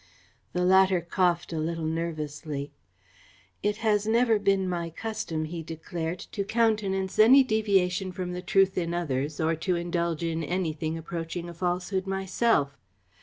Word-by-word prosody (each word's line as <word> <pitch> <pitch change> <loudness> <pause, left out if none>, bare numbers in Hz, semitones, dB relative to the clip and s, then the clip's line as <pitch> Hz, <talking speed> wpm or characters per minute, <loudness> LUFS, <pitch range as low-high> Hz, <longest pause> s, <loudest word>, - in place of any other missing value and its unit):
The 180 0 +1
latter 190 0 +5
coughed 175 0 0
a 160 - -2
little 165 +1 -2
nervously. 155 -3 -3 0.9
"It 205 0 0
has 210 -1 +2
never 230 -1 +3
been 195 -2 +2
my 170 -2 -2
custom," 170 -4 -4
he 165 +1 -5
declared, 165 +1 -5
"to 200 - -2
countenance 200 -4 0
any 255 +6 +8
deviation 195 -5 +1
from 180 -1 -4
the 180 - -4
truth 190 +1 +3
in 170 -1 -2
others 145 -3 -2
or 160 +1 +1
to 180 +3 0
indulge 170 -1 -1
in 165 -1 -1
anything 160 -2 -2
approaching 165 +1 -5
a - - -8
falsehood 180 +2 -2
myself. 190 -5 +1
180 Hz, 145 wpm, -27 LUFS, 165-195 Hz, 0.9 s, any